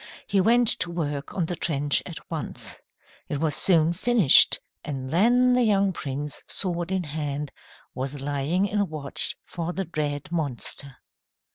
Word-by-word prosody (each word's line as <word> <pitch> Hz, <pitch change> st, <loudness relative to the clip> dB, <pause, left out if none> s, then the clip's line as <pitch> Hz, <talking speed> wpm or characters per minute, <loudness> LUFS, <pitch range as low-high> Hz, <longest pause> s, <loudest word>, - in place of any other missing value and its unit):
He 200 Hz, -2 st, +2 dB
went 235 Hz, +4 st, +3 dB
to 180 Hz, -, -1 dB
work 150 Hz, -4 st, -4 dB
on 180 Hz, -, 0 dB
the 175 Hz, -, -3 dB
trench 145 Hz, -3 st, +1 dB
at 170 Hz, -1 st, -10 dB
once. 160 Hz, -4 st, -5 dB, 0.5 s
It 145 Hz, -, -2 dB
was 155 Hz, -2 st, +1 dB
soon 165 Hz, -3 st, +4 dB
finished, 210 Hz, -, +5 dB, 0.2 s
and 135 Hz, -3 st, -5 dB
then 245 Hz, +8 st, +4 dB
the 250 Hz, -, +3 dB
young 200 Hz, -4 st, +2 dB
prince, 145 Hz, -1 st, -5 dB
sword 175 Hz, -1 st, -3 dB
in 190 Hz, -1 st, 0 dB
hand, 150 Hz, -2 st, -4 dB, 0.4 s
was 135 Hz, +2 st, -5 dB
lying 145 Hz, +7 st, 0 dB
in 205 Hz, -1 st, -1 dB
watch 150 Hz, -3 st, +3 dB
for 175 Hz, 0 st, -5 dB
the 195 Hz, +1 st, -3 dB
dread 150 Hz, -3 st, -3 dB
monster. 140 Hz, -, -3 dB
160 Hz, 150 wpm, -25 LUFS, 145-190 Hz, 0.5 s, finished